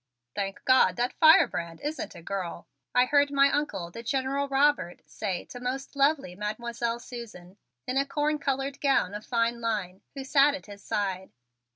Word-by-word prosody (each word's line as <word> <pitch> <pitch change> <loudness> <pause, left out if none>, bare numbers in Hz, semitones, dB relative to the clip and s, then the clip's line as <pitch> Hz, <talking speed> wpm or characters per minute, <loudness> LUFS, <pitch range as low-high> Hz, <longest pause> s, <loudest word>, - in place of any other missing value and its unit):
"Thank 195 -1 -4
God 255 -8 +5
that 245 +4 -1
firebrand 170 - +4
isn't 300 +2 -4
a 170 - -11
girl," 185 -2 -5 0.3
I 250 0 +6
heard 285 +1 +3
my 280 0 +4
Uncle, 195 -13 -2
the 230 - -8
General 270 +3 -1
Robert, 275 -9 +1
say 190 -5 -4
to 245 - -10
most 260 +3 -4
lovely 280 - +2
Mademoiselle 235 +3 -3
Susan, 215 -7 -10 0.3
in 255 - -2
a 275 - +3
corn 300 +2 0
colored 275 0 -2
gown 270 -9 +2
of 210 +1 -6
fine 235 0 0
line, 205 -5 -2
who 275 - -5
sat 280 +1 +4
at 285 - -9
his 200 -1 -12
side. 190 -2 -2
245 Hz, 170 wpm, -28 LUFS, 200-275 Hz, 0.3 s, I